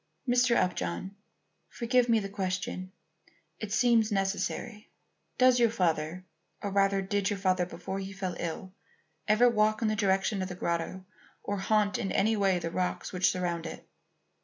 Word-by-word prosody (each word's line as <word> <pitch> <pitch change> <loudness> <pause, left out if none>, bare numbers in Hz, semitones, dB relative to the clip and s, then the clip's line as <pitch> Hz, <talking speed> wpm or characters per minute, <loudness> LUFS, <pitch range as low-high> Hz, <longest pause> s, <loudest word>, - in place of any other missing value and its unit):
"Mr. 245 -1 +3
Upjohn, 180 - -1 0.5
forgive 245 +1 +1
me 230 - +5
the 195 - -4
question; 185 -1 -3 0.7
it 215 -2 -5
seems 230 -1 +3
necessary. 205 +2 -2 0.5
Does 255 -1 +5
your 235 -1 +5
father 175 -4 -1 0.3
or 200 - -4
rather 195 0 +2
did 200 0 0
your 205 - -2
father 185 -2 +1
before 185 +2 -5
he 195 0 -6
fell 190 -2 -4
ill 180 +3 -5 0.5
ever 215 +4 +5
walk 215 -2 +2
in 220 - +2
the 215 - 0
direction 195 0 +1
of 185 - -3
the 180 - -6
grotto 170 +2 -3 0.4
or 205 - -2
haunt 205 +1 +1
in 195 - -2
any 220 +3 +2
way 195 -3 +2
the 165 -1 -4
rocks 180 +2 -2
which 180 -1 +3
surround 170 -2 -2
it?" - - -9
195 Hz, 160 wpm, -29 LUFS, 185-215 Hz, 0.7 s, me